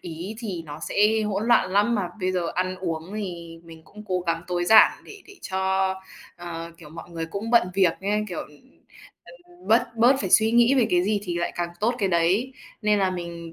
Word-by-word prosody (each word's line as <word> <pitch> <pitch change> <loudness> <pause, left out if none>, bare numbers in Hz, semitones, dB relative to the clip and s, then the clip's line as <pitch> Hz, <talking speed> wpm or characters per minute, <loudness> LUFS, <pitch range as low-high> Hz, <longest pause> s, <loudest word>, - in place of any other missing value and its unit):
ý 175 +5 -7
thì 195 -8 -5
nó 145 +1 -9
sẽ 215 +2 +3
hỗn 210 0 -2
loạn 235 -6 +3
lắm, 205 +4 +3
mà 200 -5 -1
bây 185 0 0
giờ 180 - -1
ăn 185 +1 -1
uống 165 0 -4
thì 170 -5 -6
mình 165 -1 -13
cũng 210 +5 -13
cố 185 -2 -1
gắng 165 0 -1
tối 175 -1 -1
giản 220 +4 +7
để 415 -2 -13
để 405 - -14 0.2
cho 190 0 0 0.4
ờ, 170 -1 -7
kiểu, 150 -3 -13
mọi 165 +2 -11
người 165 -1 -5
cũng 200 +7 -5
bận 235 -6 +4
việc 190 -4 +3
á, 205 +2 0
kiểu, 175 - -5
ừm, 150 -1 -12 0.6
ừm, 175 +2 -17
bớt 225 +1 +2
bớt 240 +4 +5
phải 190 - -3
suy 220 +3 +5
nghĩ 240 +2 +5
về 250 -4 +3
cái 175 0 +3
gì 205 +1 0
thì 175 -4 -3
lại 170 - -2
càng 175 -1 -2
tốt 230 +4 +1
cái 200 -4 0
đấy. 185 +9 +1 0.3
Nên 210 -1 +2
là 190 -1 +1
mình 170 -2 -7
185 Hz, 220 wpm, -24 LUFS, 170-210 Hz, 0.6 s, giản